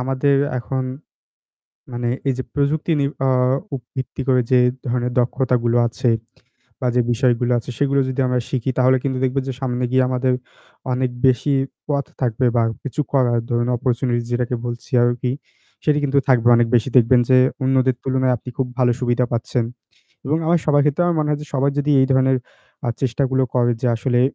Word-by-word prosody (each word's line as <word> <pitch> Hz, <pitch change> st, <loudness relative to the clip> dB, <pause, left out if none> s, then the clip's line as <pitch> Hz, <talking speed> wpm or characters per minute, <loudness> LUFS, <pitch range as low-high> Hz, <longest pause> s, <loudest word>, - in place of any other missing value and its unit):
আমাদের 135 Hz, +2 st, +1 dB, 0.2 s
এখন 130 Hz, +3 st, -3 dB, 1.1 s
মানে 120 Hz, 0 st, -2 dB, 0.2 s
এই -, -, +3 dB
যে -, -, -1 dB
প্রযুক্তি 150 Hz, +3 st, 0 dB
নির 140 Hz, 0 st, 0 dB, 0.2 s
আ -, -, +2 dB, 0.7 s
ভিত্তি 130 Hz, +1 st, -4 dB
করে 130 Hz, -1 st, +4 dB
যে 130 Hz, -, +5 dB, 0.3 s
ধরনের 125 Hz, 0 st, -1 dB
দক্ষতা 125 Hz, +1 st, 0 dB
গুলো 120 Hz, 0 st, +2 dB
আছে 120 Hz, +1 st, 0 dB, 0.7 s
বা 130 Hz, -, -1 dB
যে -, -, +5 dB
বিষয়গুলো 120 Hz, 0 st, +1 dB
আছে 115 Hz, -, -7 dB
সেগুলো 140 Hz, -1 st, +2 dB
যদি 130 Hz, +1 st, -2 dB
আমরা 125 Hz, 0 st, 0 dB
শিখি 130 Hz, 0 st, -1 dB
তাহলে 130 Hz, +1 st, +4 dB
কিন্তু 130 Hz, -2 st, -1 dB
দেখবেন 130 Hz, +1 st, 0 dB
যে 135 Hz, -, -3 dB
সামনে 125 Hz, -2 st, -2 dB
গিয়ে 130 Hz, 0 st, +4 dB
আমাদের 130 Hz, 0 st, +1 dB, 0.6 s
অনেক 125 Hz, 0 st, 0 dB, 0.2 s
বেশি 130 Hz, +3 st, +2 dB, 0.3 s
পথ 140 Hz, -1 st, 0 dB, 0.2 s
থাকবে 125 Hz, 0 st, 0 dB
বা 115 Hz, -, +4 dB, 0.2 s
কিছু 140 Hz, +1 st, -3 dB
করার 125 Hz, -4 st, +2 dB
ধরুন 120 Hz, 0 st, 0 dB
অপরচুনিটিস 120 Hz, -1 st, -1 dB
যেটাকে 120 Hz, 0 st, -1 dB
বলছি 120 Hz, 0 st, -7 dB
আরকি 120 Hz, +1 st, 0 dB, 0.5 s
সেটি 150 Hz, -1 st, +3 dB
কিন্তু 140 Hz, 0 st, +2 dB
থাকবে। 120 Hz, -3 st, +4 dB
অনেক 120 Hz, -, +3 dB
বেশি 120 Hz, +2 st, 0 dB
দেখবেন 120 Hz, +1 st, +5 dB
যে 130 Hz, -, +6 dB, 0.3 s
অন্যদের 130 Hz, 0 st, +2 dB
তুলনায় 130 Hz, -1 st, +1 dB
আপনি 120 Hz, -, -12 dB
খুব 130 Hz, -, +1 dB
ভালো 125 Hz, -1 st, +3 dB
সুবিধা 125 Hz, 0 st, +1 dB
পাচ্ছেন। 120 Hz, 0 st, -1 dB, 0.6 s
এবং 150 Hz, +3 st, +1 dB
আমার 170 Hz, +1 st, +3 dB
সবার 145 Hz, -1 st, +4 dB
ক্ষেত্রে 150 Hz, +4 st, +1 dB
আমার 175 Hz, -1 st, +1 dB
মনে 150 Hz, -, -1 dB
হয় 150 Hz, -, 0 dB
যে -, -, -9 dB
সবাই 140 Hz, +1 st, +2 dB
যদি 145 Hz, +1 st, 0 dB
এই 130 Hz, -, +4 dB
ধরনের 130 Hz, 0 st, +3 dB, 0.5 s
আ -, -, +1 dB
চেষ্টাগুলো 130 Hz, +1 st, 0 dB
করে 120 Hz, -1 st, +3 dB
যে -, -, +1 dB
আসলে 120 Hz, +1 st, 0 dB
130 Hz, 180 wpm, -20 LUFS, 120-135 Hz, 1.1 s, যে